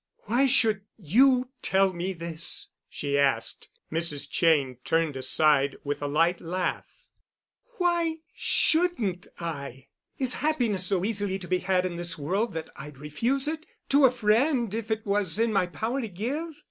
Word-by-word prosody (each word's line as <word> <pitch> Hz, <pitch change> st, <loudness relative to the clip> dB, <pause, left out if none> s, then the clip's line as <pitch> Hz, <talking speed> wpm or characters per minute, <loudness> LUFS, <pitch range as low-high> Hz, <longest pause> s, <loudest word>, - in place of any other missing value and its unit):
"Why 245 Hz, +6 st, +2 dB
should 225 Hz, -6 st, +3 dB, 0.2 s
you 250 Hz, -, +3 dB
tell 190 Hz, 0 st, +2 dB
me 180 Hz, +2 st, -3 dB
this?" 165 Hz, -2 st, -5 dB, 0.2 s
she 140 Hz, -1 st, -1 dB
asked. 140 Hz, -1 st, 0 dB, 0.2 s
Mrs. 155 Hz, -3 st, +1 dB
Cheyne 145 Hz, -7 st, +2 dB
turned 165 Hz, -3 st, 0 dB
aside 140 Hz, +1 st, +3 dB
with 145 Hz, 0 st, -3 dB
a 145 Hz, -, -2 dB
light 165 Hz, +4 st, +1 dB
laugh. 185 Hz, -, -4 dB, 0.7 s
"Why 345 Hz, -2 st, +1 dB, 0.2 s
shouldn't 315 Hz, -, +1 dB
I? 140 Hz, -6 st, -6 dB, 0.3 s
Is 255 Hz, -2 st, +2 dB
happiness 240 Hz, -11 st, +1 dB
so 190 Hz, -2 st, +1 dB
easily 205 Hz, -3 st, +1 dB
to 185 Hz, -2 st, -10 dB
be 185 Hz, +1 st, +1 dB
had 185 Hz, 0 st, +1 dB
in 175 Hz, -2 st, -4 dB
this 175 Hz, 0 st, -3 dB
world 190 Hz, +8 st, -1 dB
that 160 Hz, -1 st, -5 dB
I'd 150 Hz, 0 st, -10 dB
refuse 235 Hz, -, -1 dB
it—to 305 Hz, -2 st, 0 dB
a -, -, +7 dB
friend 235 Hz, 0 st, +1 dB
if 225 Hz, 0 st, -4 dB
it 220 Hz, 0 st, -2 dB
was 200 Hz, -3 st, +1 dB
in 225 Hz, 0 st, +1 dB
my 190 Hz, -3 st, +2 dB
power 230 Hz, +9 st, -3 dB
to 225 Hz, -, -5 dB
give? 280 Hz, -, -4 dB
190 Hz, 155 wpm, -27 LUFS, 165-245 Hz, 0.7 s, a